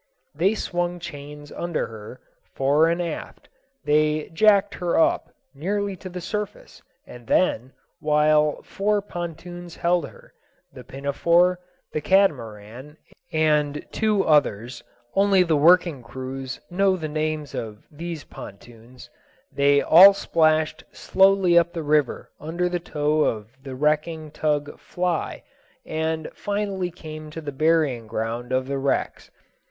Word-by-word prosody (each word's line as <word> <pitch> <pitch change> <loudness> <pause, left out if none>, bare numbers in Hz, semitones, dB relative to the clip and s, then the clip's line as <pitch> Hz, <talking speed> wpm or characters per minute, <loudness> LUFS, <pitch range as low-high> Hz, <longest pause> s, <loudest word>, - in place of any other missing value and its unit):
They 185 +8 +1
swung 175 -3 -2
chains 145 -3 -9
under 170 -2 -2
her, 110 +2 -10 0.4
fore 145 +4 +3
and 170 +1 0
aft, 175 -1 -6 0.4
they 150 +1 +1
"jacked 205 +2 +4
her 175 -1 0
up" - - +2 0.2
nearly 200 +7 -2
to 185 - -9
the 180 0 -6
surface, 210 +3 -6 0.2
and 120 -2 -13
then, 130 -8 +1 0.3
while 150 0 +2
four 205 0 -1
pontoons 175 -1 -7
held 170 -4 0
her, - - -19 0.4
the - - -11
Pinafore, 170 +6 +1 0.3
the 155 - -1
Catamaran, 130 - 0 0.3
and 150 -2 +1
two 215 -3 +1
others 125 -5 +1 0.3
(only 195 -1 +4
the 165 -3 +1
working 165 -1 +4
crews 130 +2 -7
know 190 +1 +2
the 160 -3 -4
names 155 -2 -3
of 110 -2 -6
these 165 0 -6
pontoons), 115 +4 -13 0.4
they 140 0 +3
all 190 +5 +9
splashed 155 -4 +1
slowly 190 -2 +4
up 170 0 -1
the 165 -2 -4
river 150 -3 0
under 170 +4 -2
tow 155 -2 0
of 110 -6 -1
the 135 -1 -8
wrecking 155 +2 -1
tug 145 -1 -2
Fly, 180 -2 -3 0.4
and 160 0 -2
finally 200 -3 -2
came 155 -3 -9
to 155 - -7
the 150 -2 -6
burying 145 -5 +1
ground 115 +3 -4
of 130 0 0
wrecks. 140 0 -2
155 Hz, 125 wpm, -23 LUFS, 140-175 Hz, 0.4 s, all